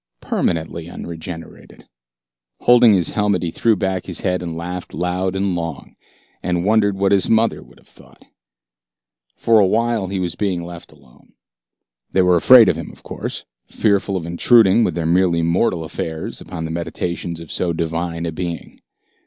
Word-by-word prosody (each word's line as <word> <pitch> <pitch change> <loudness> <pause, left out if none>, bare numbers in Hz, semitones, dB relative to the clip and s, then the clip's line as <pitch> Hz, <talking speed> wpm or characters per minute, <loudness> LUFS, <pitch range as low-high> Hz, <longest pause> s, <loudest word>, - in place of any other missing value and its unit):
Permanently 80 0 -2
unregenerated. 85 -1 -9 0.7
Holding 120 -3 +6
his 90 -4 +1
helmet, 105 -4 0
he 85 - -2
threw 115 +4 +2
back 95 -1 -2
his 90 -4 -1
head 90 -1 -1
and 85 -2 -5
laughed 90 0 -6
loud 90 +3 -1
and 95 -1 0
long, 85 -1 -5 0.5
and 90 0 -1
wondered 105 -2 +2
what 100 0 +1
his 100 -2 +2
mother 115 0 +2
would - - -18
have - - -23
thought. - - -19 1.1
For 115 -1 +3
awhile 110 +1 +1
he 95 +1 -3
was 90 -2 -2
being 90 -3 -2
left 85 0 -10
alone. 70 -5 -22 0.8
They 95 - +4
were 90 -1 +4
afraid 115 +6 +7
of 80 - +2
him, 85 - -7
of - - -17
course, - - -6 0.2
fearful 100 -2 0
of 85 - -5
intruding 100 +5 +4
with 85 - 0
their 85 -2 -2
merely 85 0 +2
mortal 85 0 +1
affairs 80 0 -5
upon 80 -3 -6
the 80 - -5
meditations 85 0 -4
of 85 -2 -10
so 90 - -1
divine 85 +1 -3
a 85 - -2
being. 85 +1 -6
90 Hz, 165 wpm, -19 LUFS, 85-100 Hz, 1.1 s, afraid